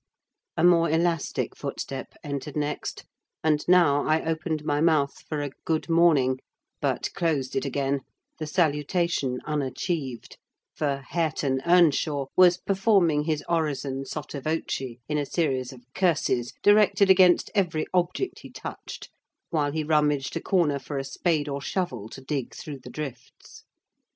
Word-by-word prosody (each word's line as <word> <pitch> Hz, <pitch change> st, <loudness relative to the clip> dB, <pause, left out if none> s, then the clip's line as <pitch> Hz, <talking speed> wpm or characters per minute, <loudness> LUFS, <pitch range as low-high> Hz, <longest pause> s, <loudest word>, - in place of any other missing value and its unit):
A 160 Hz, -, +1 dB
more 170 Hz, -1 st, +5 dB
elastic 165 Hz, 0 st, 0 dB
footstep 135 Hz, -1 st, -6 dB
entered 145 Hz, 0 st, -5 dB
next; 150 Hz, 0 st, -3 dB, 0.4 s
and 150 Hz, -1 st, +2 dB
now 170 Hz, -6 st, +5 dB
I 155 Hz, +1 st, +1 dB
opened 160 Hz, -1 st, -2 dB
my 145 Hz, 0 st, +1 dB
mouth 155 Hz, -4 st, +3 dB, 0.2 s
for 150 Hz, -2 st, -2 dB
a 145 Hz, -, -4 dB
"good 160 Hz, +1 st, -1 dB
morning," 155 Hz, -6 st, +4 dB, 0.4 s
but -, -, -1 dB
closed 150 Hz, -6 st, -1 dB
it 135 Hz, -, 0 dB
again, 140 Hz, 0 st, 0 dB, 0.4 s
the 155 Hz, -, -4 dB
salutation 150 Hz, -4 st, 0 dB
unachieved; 145 Hz, -2 st, -3 dB, 0.3 s
for 140 Hz, -2 st, -2 dB
Hareton 150 Hz, -5 st, 0 dB
Earnshaw 155 Hz, -5 st, +3 dB
was 180 Hz, -1 st, +6 dB
performing 190 Hz, -7 st, +2 dB
his 155 Hz, -2 st, -1 dB
orison 140 Hz, -5 st, -1 dB
sotto 145 Hz, 0 st, -6 dB
voce, 135 Hz, -5 st, -3 dB
in 150 Hz, 0 st, 0 dB
a 145 Hz, -, -1 dB
series 135 Hz, -7 st, -1 dB
of 130 Hz, -2 st, -13 dB
curses 150 Hz, -9 st, +1 dB
directed 205 Hz, -1 st, +5 dB
against 185 Hz, -2 st, +5 dB
every 175 Hz, -7 st, +1 dB
object 180 Hz, -, 0 dB
he -, -, -11 dB
touched, -, -, -8 dB, 0.4 s
while 150 Hz, -3 st, +1 dB
he 155 Hz, +1 st, -2 dB
rummaged 150 Hz, -3 st, +1 dB
a -, -, -2 dB
corner 160 Hz, -7 st, +1 dB
for 140 Hz, +2 st, -6 dB
a 135 Hz, -, -1 dB
spade 150 Hz, +2 st, -1 dB
or 140 Hz, -1 st, -3 dB
shovel 130 Hz, -, -3 dB
to 135 Hz, -, -10 dB
dig 135 Hz, -1 st, -4 dB
through 145 Hz, -3 st, -7 dB
the 125 Hz, -1 st, -11 dB
drifts. 130 Hz, -4 st, -9 dB
150 Hz, 145 wpm, -26 LUFS, 140-170 Hz, 0.4 s, was